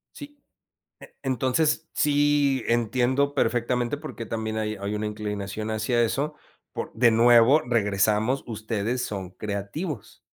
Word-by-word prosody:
Sí, 290 0 -11 0.6
e - - -14
entonces, 135 +5 0
sí, 145 -2 +2
entiendo 125 +4 +1
perfectamente, 120 +1 0
porque 145 -6 -7
también 110 0 -3
hay 110 0 -2
hay 100 +1 -4
una 105 0 -2
inclinación 105 0 -4
hacia 115 +2 +1
eso, 140 +6 -1 0.4
por - - -5
de 120 +1 +4
nuevo, 120 +5 +6
regresamos, 110 +2 +1
ustedes 110 +2 -2
son 95 -3 -5
creativos. 105 - -5
115 Hz, 120 wpm, -25 LUFS, 105-135 Hz, 0.6 s, nuevo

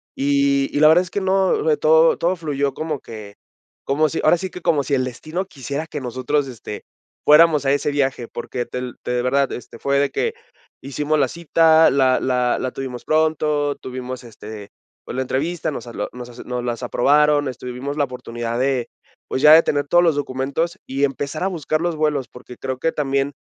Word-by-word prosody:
Y 140 0 +2
y - - +2
la 155 - +7
verdad 160 +3 +6
es 180 -1 -7
que - - -1
no, 190 0 +2
le 155 -1 +2
todo 160 +2 +4
todo 175 +2 0
fluyó 140 -3 -2
como 155 -3 -4
que 105 -3 -10 0.5
como 150 +3 +2
si 160 - -3
ahora 160 +3 +5
sí 190 +2 -5
que 180 - -10
como 160 -5 +2
si 140 - -3
el 130 -2 +2
destino 155 +8 -4
quisiera 140 -2 -6
que 150 - -5
nosotros, 130 +3 -1
este, 115 -4 -8 0.4
fuéramos 150 -1 +6
a 135 - +3
ese 145 +1 0
viaje. 135 -4 -1
Porque 120 +1 -5
te 125 - -5 0.2
te - - -3
de 125 - 0
verdad, 135 +2 +1
este, 125 - -8
fue 140 0 +1
de 140 - +2
que 455 - -1 0.5
hicimos 145 +3 -1
la 135 - +3
cita, 165 0 +4
la 130 -2 +3
la 125 -1 +1
la 130 - -2
tuvimos 125 -2 -6
pronto, 150 -2 +1
tuvimos, 130 0 -7
este, 105 -2 -10 0.4
pues, - - -7
la 130 - -1
entrevista, 155 +6 -2
nos 130 - -7
habló 115 - -4
nos 125 0 -8
asu 120 0 -11
nos 125 -1 -3
las 120 0 -3
aprobaron, 145 +4 +3
este, 130 -1 -7
vivimos 130 +4 -5
la 145 - +2
oportunidad 120 -2 -4
de, 130 -2 0 0.4
pues, 130 - -2
ya 150 +1 +9
de 165 +1 +8
tener 145 -1 0
todos 175 +2 +4
los 165 -4 +3
documentos 145 +5 -2
y 135 +2 -2
empezar 140 +4 -4
a - - +2
buscar 155 -4 -2
los 175 -1 -1
vuelos, 150 -4 0
porque 125 -1 -13
creo 130 -1 -4
que 165 - +1
también 140 -2 -1
140 Hz, 205 wpm, -21 LUFS, 130-155 Hz, 0.5 s, ya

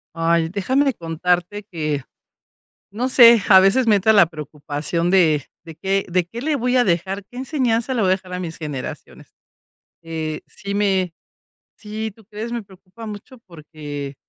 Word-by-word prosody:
Ay, 165 0 +1
déjame 255 +9 +1
de 275 - +2
contarte 175 +4 -1
que 150 -5 -2 0.9
no 240 +6 -2
sé, 235 -4 +7
a 190 -2 +9
veces 195 +7 +4
me 215 -3 +5
entra 220 +3 +3
la 200 -4 +7
preocupación 155 +1 -4
de 160 -7 +3 0.2
de 165 -1 -11
qué 195 +3 -1
de 180 0 +1
qué 230 +7 -8
le 305 +2 0
voy 250 -1 +1
a 250 - +5
dejar 190 +3 -1
qué 245 +4 -14
enseñanza 255 -3 0
le 240 - 0
voy 195 - +2
a - - +4
dejar 185 -1 -11
a 180 - -3
mis 170 -2 -6
generaciones. 150 -5 -7 0.7
Eh, 160 -1 -4
sí 200 0 -7
me 190 -4 +1 0.6
sí, 220 +1 -5
tú 225 - -20
crees, 215 +3 -7
me 235 -1 -3
preocupa 190 +2 -14
mucho 210 +4 -9
porque, 150 -4 -8
190 Hz, 170 wpm, -21 LUFS, 165-220 Hz, 0.9 s, a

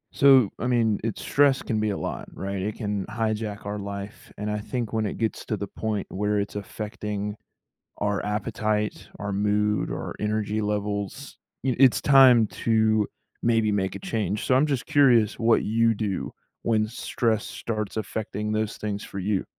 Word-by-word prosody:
So, 135 -7 +6
I 125 - -1
mean, 115 -4 +2
it's 115 -2 -3
stress 140 -1 +3
can 110 - -1
be 110 0 +1
a 100 - -2
lot, - - -5
right? 100 0 -4
It 105 +2 -2
can 105 -3 -2
hijack 110 -1 -2
our 105 +1 -3
life, 100 +1 -7
and 105 +1 -3
I 105 0 -1
think 115 +1 -4
when 110 -1 +1
it - - -5
gets 110 -1 -2
to 110 - -2
the 100 - -3
point 105 0 -3
where 105 +2 0
it's 100 0 -3
affecting 105 0 -4 0.6
our 105 -1 -1
appetite, 105 0 -1
our 100 +1 -3
mood, 105 +1 +1
our - - -4
energy 105 0 -1
levels, 105 +5 -3 0.3
y 130 -2 +1
it's 135 -3 +6
time 130 -5 +7 0.2
to 110 -2 +3 0.4
maybe 115 -2 +3
make 95 -2 0
a - - -5
change. 105 - -2
So, 130 - +3
I'm 130 +3 +5
just 140 -5 -1
curious 125 -8 +4
what 115 0 +3
you 115 +1 +3
do 100 -3 -3 0.3
when 110 -2 +2
stress 115 -1 -1
starts 110 -2 -4
affecting 105 0 -3
those 110 0 -1
things 105 -1 -3
for 100 - -7
you? 95 0 0
105 Hz, 175 wpm, -25 LUFS, 105-115 Hz, 0.6 s, time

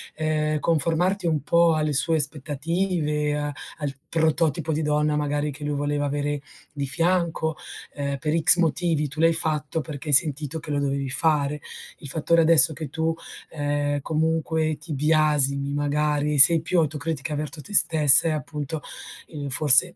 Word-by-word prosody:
ehm, 155 -1 -1
conformarti 170 +4 0
un 155 -3 0
po' 170 +1 +3
alle 155 -1 -1
sue 150 +4 +1
aspettative, 150 +1 -2
a 145 0 -3 0.3
al 145 -2 -3
prototipo 160 -1 0
di 155 +1 -1
donna 150 0 0
magari 150 0 -1
che 145 +2 -10
lui 145 0 -2
voleva 145 0 -2
avere 145 0 -2 0.3
di 145 -2 -4
fianco, 165 +1 +1 0.4
ehm, 140 -1 -3
per 155 +4 -1
X 175 +2 +6
motivi 165 -2 0
tu 145 +3 -10
l'hai 165 +1 +4
fatto 160 -1 -2
perché 150 0 -8
hai - - +1
sentito 150 +1 +1
che 155 - -11
lo 145 -1 -1
dovevi 140 -1 -2
fare. 150 0 +1 0.4
Il 145 - -11
fattore 165 +3 +2
adesso 160 -1 +5
che 155 -1 -7
tu, 160 +3 -2 0.3
ehm, 145 -1 -2
comunque 160 0 -1
ti 155 +1 -8
biasimi, 145 -2 +1
magari 150 0 0
sei 155 +4 +7
più 175 +2 -2
autocritica 155 -1 -3
verto 150 +1 -5
te 205 - -11
stessa 150 -4 +5
è 160 - +1
appunto, 150 0 -5 0.5
ehm, 145 -3 -6
forse 145 +5 +4
150 Hz, 160 wpm, -23 LUFS, 145-160 Hz, 0.5 s, sei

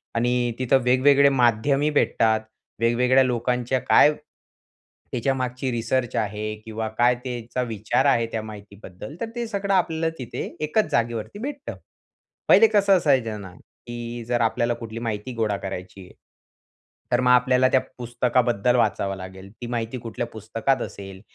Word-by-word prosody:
आणि 120 +1 +1
तिथं 130 +1 +3
वेग-वेगळे 135 +3 +5
माध्यमही 135 +3 +2
भेटतात. 110 -6 +2 0.4
वेग-वेगळ्या 125 +3 +3
लोकांच्या 125 +1 0
काय 150 - +5 1.0
त्याच्यामागची 130 +1 -2
रिसर्च 120 +1 -1
आहे 105 0 -2
किंवा 110 0 -4
काय 120 +1 +4
त्याचा 125 -1 -4
विचार 110 +3 -1
आहे 115 -5 +3
त्या 110 - -2
माहितीबद्दल. 105 - -10
तर 230 - -2
ते 235 -1 -3
सगळं 200 -2 -2
आपल्याला 165 -3 +1
तिथे 125 -2 -5 0.2
एकाच 210 +8 0
जागेवरती 115 - -2
भेटतं. 280 +4 -6 0.7
पहिले 225 - +7
कसं 200 -2 +4
असायचं 130 - +1
ना, 95 -2 -10 0.3
की 120 0 -6
जर 120 -1 0
आपल्याला 120 +1 +1
कुठली 115 -1 -7
माहिती 115 +1 -4
गोळा 110 -3 0
करायची 95 0 -7
आहे, - - -17 1.0
तर 120 0 +3
मग 125 - +2
आपल्याला 125 +1 +4
त्या 130 - +4 0.2
पुस्तकाबद्दल 120 -1 +1
वाचावं 100 -4 +1
लागेल. 95 +1 -10
ती 120 +3 -9
माहिती 120 +1 -3
कुठल्या 115 0 -5
पुस्तकात 115 +4 -1
असेल 95 -1 -8
120 Hz, 140 wpm, -24 LUFS, 110-130 Hz, 1.0 s, पहिले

